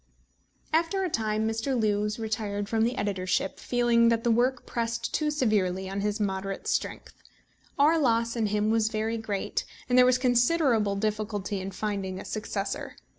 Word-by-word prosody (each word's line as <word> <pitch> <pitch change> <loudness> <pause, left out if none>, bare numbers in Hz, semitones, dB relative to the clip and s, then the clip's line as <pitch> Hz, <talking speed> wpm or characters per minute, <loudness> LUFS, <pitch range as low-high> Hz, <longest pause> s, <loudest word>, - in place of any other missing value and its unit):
After 335 +4 +2
a 365 - -2
time 215 -2 0
Mr. 225 +4 -1
Lewes 210 -1 0
retired 215 -3 -3
from 220 0 +1
the 240 +2 0
editorship, 190 -2 -1
feeling 240 -1 +3
that 230 0 +1
the 235 - +3
work 245 +2 +1
pressed 230 -1 -3
too 305 -1 +1
severely 200 -10 0
on 195 +1 -3
his 210 +1 -1
moderate 195 -1 -2
strength. - - -2 0.6
Our 310 +4 +4
loss 230 -4 +1
in 225 -2 +1
him 210 +1 +1
was 220 -1 +2
very 220 +1 -2
great, 205 -3 -2 0.2
and 250 0 +4
there 250 - +8
was 255 0 +4
considerable 245 -4 +2
difficulty 210 -1 -2
in 190 - -4
finding 195 -1 -3
a - - -8
successor. 210 -2 -4
220 Hz, 165 wpm, -27 LUFS, 205-240 Hz, 0.6 s, there